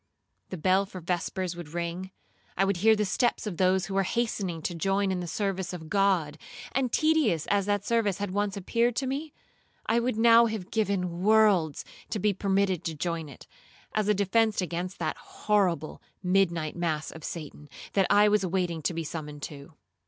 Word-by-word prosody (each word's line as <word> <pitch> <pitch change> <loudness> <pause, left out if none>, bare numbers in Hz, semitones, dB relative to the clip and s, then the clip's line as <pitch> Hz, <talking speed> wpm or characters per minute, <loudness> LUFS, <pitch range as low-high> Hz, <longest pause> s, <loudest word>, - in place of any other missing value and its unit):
The 185 - -5
bell 190 +4 +2
for 190 - -8
vespers 180 +1 -2
would 170 -2 -9
ring, 175 +2 -3 0.5
I 195 - +3
would 195 -2 0
hear 220 +4 +5
the 210 0 0
steps 235 +5 0
of 195 -6 -4
those 185 0 +2
who 195 - -6
were 195 - +3
hastening 195 -5 -2
to 175 - -2
join 195 +3 0
in 185 - -1
the 175 - -4
service 190 0 -2
of 160 -3 -8
God, 185 -7 +2 0.3
and 260 -2 0
tedious 310 - +2
as 200 -1 +2
that 205 -1 0
service 225 -5 +1
had 205 -2 -3
once 205 0 -1
appeared 235 +5 +1
to 270 - -1
me, 285 +4 -3 0.5
I 230 +2 +2
would 235 -1 -1
now 230 +1 +6
have 215 -5 -5
given 185 -5 -1
worlds 205 -7 +3 0.2
to - - -2
be 210 +1 +1
permitted 195 -2 0
to 160 - -2
join 165 0 -3
in 135 - -10
it, - - -16 0.5
as 215 -1 0
a 210 - +3
defence 215 +2 +2
against 180 +1 -3
that 155 -2 -2
horrible 185 -7 -1 0.2
midnight 175 -4 +1
mass 160 -3 -2
of 160 - -11
Satan,2 150 -2 -7 0.2
that 195 -2 +3
I 205 +1 +6
was 210 -1 +3
awaiting 175 -3 -1
to 165 +3 -1
be 165 - -2
summoned 150 -2 -7
to. 140 +1 -8
190 Hz, 190 wpm, -28 LUFS, 170-210 Hz, 0.5 s, now